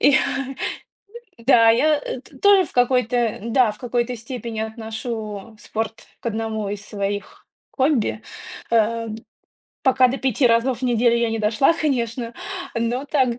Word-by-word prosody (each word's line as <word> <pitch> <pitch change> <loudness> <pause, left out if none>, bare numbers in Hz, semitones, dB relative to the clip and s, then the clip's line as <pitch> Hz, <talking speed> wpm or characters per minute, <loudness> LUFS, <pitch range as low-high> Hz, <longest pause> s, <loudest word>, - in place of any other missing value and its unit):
И 285 - +6
я 270 0 0 0.8
да 230 -1 +6
я 295 +6 +3
т 265 +1 -7
тоже 400 -2 +6
в - - -11
какой-то 245 -2 +2
да, 235 0 +3
в - - -16
какой-то 245 0 -1
степени 230 -1 -6
отношу 220 -1 -5
спорт 225 0 -4
к - - -9
одному 220 -2 -2
из 205 +1 -5
своих 205 -1 -4 0.3
хобби. 250 - +1 0.5
Э, 230 0 +2 0.7
пока 260 -1 +5
до 265 +2 -2
5 260 0 +2
разов 235 +1 +2
в - - -17
неделю 240 -1 +3
я 235 -1 +1
не 225 - -1
дошла, 220 +8 +3
конечно, 240 -6 -1 0.4
но 235 +3 -1
так 260 -5 +1
235 Hz, 145 wpm, -22 LUFS, 220-255 Hz, 0.8 s, И